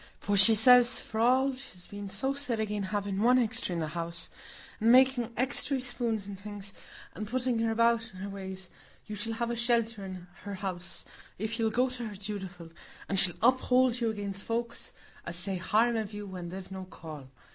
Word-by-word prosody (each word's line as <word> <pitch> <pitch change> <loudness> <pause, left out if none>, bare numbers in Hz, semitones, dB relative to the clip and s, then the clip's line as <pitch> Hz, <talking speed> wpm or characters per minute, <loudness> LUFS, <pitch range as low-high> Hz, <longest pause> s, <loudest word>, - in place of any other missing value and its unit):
For 205 - 0
she 205 +3 +7
says, 245 +2 +6
for 220 - -6
all 260 +4 +4
she's 185 -9 -11
been 205 -1 -7
so 225 +8 -1
set 275 -5 -2
again' 210 -3 -2
having 205 -1 -1
one 250 +3 +5
extry 230 -6 +1
in - - -2
the 160 -2 -2
house, 170 +1 -3 0.5
and 225 +2 +4
making 255 -2 +5
extry 265 +1 +1
spoons 235 -4 -2
and 200 -1 -8
things, 200 -1 -7 0.4
and 215 - -5
putting 250 0 0
her 225 0 +1
about 230 0 +2
in 185 - -13
her 200 - -4
ways, 190 -2 -7 0.3
you 210 - -6
shall 225 +2 -3
have 235 +1 -2
a - - -1
shelter 230 -3 +1
in 185 -2 -7 0.2
her 200 +1 -5
house, 185 -2 -4 0.3
if 220 +4 -2
you'll 225 -1 +2
go 245 +4 +2
to 245 -2 -4
her 210 - -7
dutiful, 190 -4 -6 0.4
and 195 - +2
she'll 175 -2 +4
uphold 255 0 +4
you 230 - +2
against 200 -2 -4
folks 235 +2 -3 0.3
as - - -2
say 185 +2 +4
harm 220 +6 +2
of 215 -2 -3
you 205 0 -5
when 180 -3 -6
they've 185 +1 -8
no 190 -1 -6
call. 155 -7 -10
215 Hz, 200 wpm, -30 LUFS, 190-235 Hz, 0.5 s, she